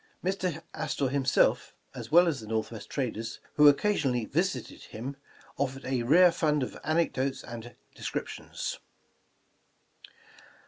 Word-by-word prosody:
Mr. 185 -4 -1
Astor 135 -2 -1
himself, 135 -1 +2 0.2
as - - -8
well 175 +2 +7
as 155 -5 0
the 110 - -10
Northwest 110 0 -3
traders 115 -4 -3
who 150 0 +7
occasionally 140 - +3
visited 140 - -2
him, 125 +6 -6 0.4
offered 135 -1 -2
a 130 -2 0
rare 170 +9 +6
fund 150 -4 +1
of - - -5
anecdotes 155 -4 0
and 120 0 -9 0.2
descriptions. - - -5
135 Hz, 120 wpm, -29 LUFS, 120-160 Hz, 0.4 s, well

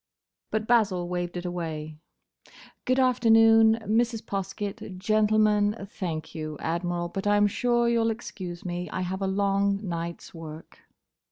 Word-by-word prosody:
But 215 0 -1
Basil 205 -7 +2
waved 175 0 -3
it 175 - -5
away. 160 -3 -5 0.9
"Good 255 +1 +2
afternoon, 225 -3 +5
Mrs. 225 +2 +1
Poskett—Gentlemen. 205 +2 0 0.2
Thank 165 -6 -5
you, 155 -1 -5
Admiral, 175 +1 -2
but 195 +3 -4
I 205 0 +4
'm 205 - +5
sure 240 +3 +1
you 235 -1 +2
'll 225 - +2
excuse 190 -6 -6
me. 175 0 -4
I - - -3
have 185 +2 -3
a 195 - 0
long 200 0 +1
night's 170 0 -5
work." 160 -1 -10
195 Hz, 140 wpm, -27 LUFS, 175-220 Hz, 0.9 s, afternoon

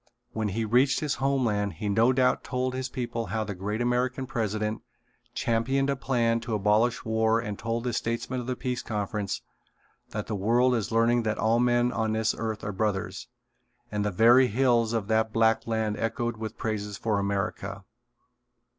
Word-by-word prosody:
When 110 -1 -1
he 110 +3 -1
reached 125 +5 +3
his 150 -2 0
homeland 115 -7 +1
he 105 - -5
no 110 +5 +4
doubt 130 0 +2
told 130 -1 -2
his 130 0 -3
people 120 -3 -3
how 110 +3 -1
the 105 -1 -4
great 105 +5 -3
American 125 +2 0
president 110 -4 -2 0.5
championed 135 +5 +1
a - - 0
plan 120 -3 +1
to 115 -1 -3
abolish 105 +4 +2
war 110 0 +2
and 105 -3 -5
told 115 +1 -2
the 125 -1 -2
statesmen 115 +3 -2
of 120 - -6
the 130 - -1
Peace 125 -1 -3
Conference 105 -1 -3 0.7
that 105 -1 -4
the 110 - -4
world 120 +6 +3
is 115 -4 -1
learning 115 +1 +3
that 110 -1 -1
all 115 +1 +2
men 120 0 +3
on 110 -2 -1
this 110 0 +1
earth 110 -2 -4
are 105 - -2
brothers, 105 0 -2 0.6
and 105 -1 -1
the 105 - +1
very 120 +6 +6
hills 120 -1 +2
of 115 -4 -1
that 110 0 +1
black 115 0 +2
land 110 -2 0
echoed 120 +1 -2
with 110 -1 -6
praises 105 -2 -3
for 110 -3 0
America. 100 0 -3
115 Hz, 180 wpm, -27 LUFS, 105-125 Hz, 0.7 s, very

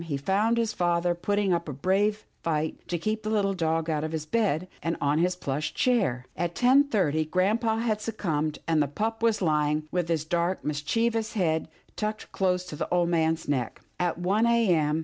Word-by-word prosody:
he 145 -4 -2
found 205 +10 +1
his 225 -2 0
father 175 -1 +1
putting 200 +2 0
up 170 -2 -2
a - - -4
brave 200 +9 +1 0.2
fight 155 -1 -1
to 175 - -1
keep 215 +6 -2
the 215 - -4
little 200 -2 +1
dog 165 -2 0
out 155 -2 -1
of 155 0 -3
his 155 -1 -3
bed, 185 -3 0
and 165 0 -1
on 145 +2 +1
his 180 +1 +2
plush 155 -2 -3
chair. 195 - +1
At 175 -1 -2
ten 260 +3 +5
thirty 170 - +1
grampa 210 +7 +1
had 220 -2 0
succumbed, 155 -9 -2
and 160 -2 +3
the 145 - +1
pup 220 +10 -3
was 225 -3 +2
lying 150 -1 +1
with 180 -2 0
his 160 -2 0
dark 175 +2 -1
mischievous 220 +10 0
head 160 -6 0 0.3
tucked 215 0 -4
close 180 -1 0
to 180 - -7
the - - -4
old 175 -1 +2
man's 160 -1 +1
neck. 130 -5 -1 0.2
At 175 -2 0
one 200 +6 +2
a. 235 -3 +3
m. 155 -1 +1
175 Hz, 200 wpm, -27 LUFS, 155-215 Hz, 0.3 s, ten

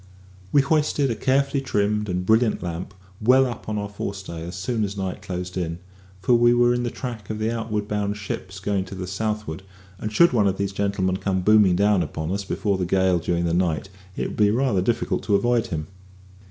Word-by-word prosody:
We 140 - +5
hoisted 145 -2 +1
a - - -1
carefully 135 +4 +1
trimmed 105 -4 0
and 90 0 -2
brilliant 110 +1 +3
lamp 90 +3 -5 0.3
well 130 +4 +5
up 120 -3 -6
on 105 - -1
our 105 0 -2
fore 100 0 -5
stay 85 -4 -7
as 85 +2 -6
soon 110 +4 -1
as 100 0 -3
night 95 -1 -3
closed 90 -1 -5
in, 85 -2 -2 0.4
for 110 +7 +3
we 120 0 +5
were 120 0 +4
in 120 - 0
the 120 - -1
track 115 -5 -7
of 110 - -3
the 110 +1 -1
outward 110 -2 -2
bound 105 -1 -1
ships 95 -1 -6
going 100 0 -1
to 95 - -8
the 95 0 -5
southward, 105 -2 -3 0.4
and 105 - -4
should 170 +7 +5
one 105 -4 +3
of 95 0 0
these 100 0 -2
gentlemen 95 -2 0
come 95 -1 -1
booming 105 -2 +5
down 100 0 +3
upon 80 +1 -3
us 100 +1 -2
before 100 0 -1
the 90 - 0
gale 95 -1 +3
during 85 +1 -1
the 85 - 0
night, 90 +1 0 0.3
it - - -2
would - - -8
be 105 -1 +4
rather 115 -3 +2
difficult 115 +5 0
to 105 - +3
avoid 120 +1 +2
him. 75 -2 -3
100 Hz, 220 wpm, -24 LUFS, 95-115 Hz, 0.4 s, We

